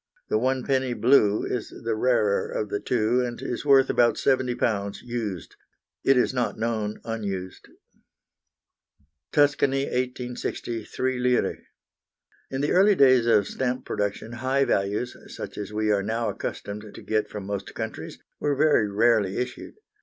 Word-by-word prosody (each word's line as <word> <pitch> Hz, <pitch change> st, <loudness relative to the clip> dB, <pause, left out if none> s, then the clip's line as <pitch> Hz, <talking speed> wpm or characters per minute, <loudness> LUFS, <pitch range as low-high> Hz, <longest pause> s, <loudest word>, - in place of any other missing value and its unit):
The 110 Hz, -, +2 dB
1d., 130 Hz, -1 st, 0 dB
blue, 110 Hz, -4 st, +4 dB
is 120 Hz, -, -3 dB, 0.2 s
the 115 Hz, -, +1 dB
rarer 110 Hz, -3 st, +2 dB
of 105 Hz, -, -3 dB
the 105 Hz, -, -2 dB
two, 120 Hz, +1 st, +1 dB
and 120 Hz, -1 st, -4 dB
is 120 Hz, -, -4 dB
worth 135 Hz, -2 st, +5 dB
about 120 Hz, -2 st, +3 dB
£70 120 Hz, -6 st, 0 dB
used; 115 Hz, -7 st, -5 dB, 0.5 s
it 135 Hz, -1 st, +4 dB
is 125 Hz, -, +2 dB
not 125 Hz, -2 st, -1 dB
known 110 Hz, -2 st, -2 dB
unused. 100 Hz, -5 st, -5 dB, 1.6 s
Tuscany, 140 Hz, -2 st, +3 dB
1860, 125 Hz, -3 st, -3 dB
3 130 Hz, -1 st, -2 dB
lire. 125 Hz, 0 st, +1 dB, 0.9 s
In 135 Hz, 0 st, -3 dB
the 145 Hz, -, 0 dB
early 195 Hz, +3 st, +5 dB
days 130 Hz, -6 st, +5 dB
of 105 Hz, -3 st, +4 dB
stamp 125 Hz, 0 st, -2 dB
production 105 Hz, +2 st, -3 dB
high 130 Hz, +3 st, +1 dB
values, 105 Hz, +4 st, -1 dB
such -, -, -8 dB
as 105 Hz, 0 st, -5 dB
we 105 Hz, 0 st, 0 dB
are 100 Hz, -1 st, +2 dB
now 115 Hz, +3 st, -1 dB
accustomed 105 Hz, +1 st, -5 dB
to -, -, -9 dB
get 110 Hz, -1 st, 0 dB
from 105 Hz, -2 st, -7 dB
most 100 Hz, -1 st, -5 dB
countries, -, -, -6 dB, 0.2 s
were 145 Hz, -1 st, 0 dB
very 145 Hz, -7 st, +3 dB
rarely 105 Hz, -2 st, +2 dB
issued. 125 Hz, -, -5 dB
120 Hz, 145 wpm, -25 LUFS, 105-130 Hz, 1.6 s, worth